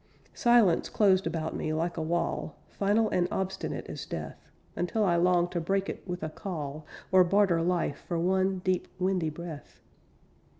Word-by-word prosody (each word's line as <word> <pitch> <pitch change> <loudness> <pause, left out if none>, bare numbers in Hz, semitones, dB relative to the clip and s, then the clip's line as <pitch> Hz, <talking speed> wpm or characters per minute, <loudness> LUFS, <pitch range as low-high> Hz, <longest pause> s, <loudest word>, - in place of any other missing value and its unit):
Silence 235 -8 +4
closed 190 -4 +3
about 160 -1 -3
me, 155 - -2
like 165 +2 -1
a 165 - -3
wall, 165 -2 -2
Final 210 +3 +2
and 175 -1 +2
obstinate 190 -1 -3
as - - -6
death. - - -7 0.3
Until 195 +5 0
I 175 -3 +3
longed 175 0 +3
to 175 - -1
break 195 +3 0
it - - -5
with 180 -2 -4
a 155 - -2
call, 155 -4 -6 0.2
Or 185 -1 +7
barter 185 -2 +3
life 170 -4 -1
for 170 - -1
one 190 +2 +1
deep, 185 -1 +1
windy 185 -3 0
breath. 160 -1 -9
180 Hz, 165 wpm, -29 LUFS, 165-190 Hz, 0.3 s, Or